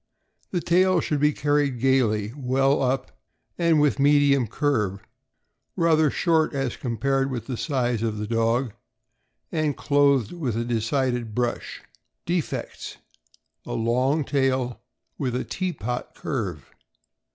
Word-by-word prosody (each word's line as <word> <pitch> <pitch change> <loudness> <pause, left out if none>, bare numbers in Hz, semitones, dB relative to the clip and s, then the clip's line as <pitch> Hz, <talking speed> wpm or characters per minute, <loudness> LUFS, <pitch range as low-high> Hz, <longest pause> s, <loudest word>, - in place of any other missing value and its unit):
— - - -42
The 175 - -1
tail 185 +1 +3
should 150 -2 -1
be 150 +1 +4
carried 145 -3 0
gaily, 115 -5 +2
well 135 +1 +1
up, 130 0 0 0.5
and 165 -2 +4
with 145 -3 +2
medium 140 -3 +4
curve, 105 -7 0 0.8
rather 160 -3 +3
short 160 -1 +1
as 135 -3 -1
compared 135 +2 -1
with 125 -4 -4
the 130 - -4
size 125 -4 -1
of 110 -2 -1
the 105 - -3
dog, 115 +1 0 0.8
and 155 -3 0
clothed 140 -5 +2
with 135 -11 -3
a 115 - -1
decided 120 -1 -1
brush. 120 -1 -2 0.4
Defects: 170 -1 -3 0.7
A - - -6
long 125 +6 +1
tail, 130 -3 0 0.4
with 125 -4 -1
a 125 - -1
tea 185 -1 -2
pot 125 - -5
curve. 95 - -4
135 Hz, 130 wpm, -24 LUFS, 120-145 Hz, 0.8 s, be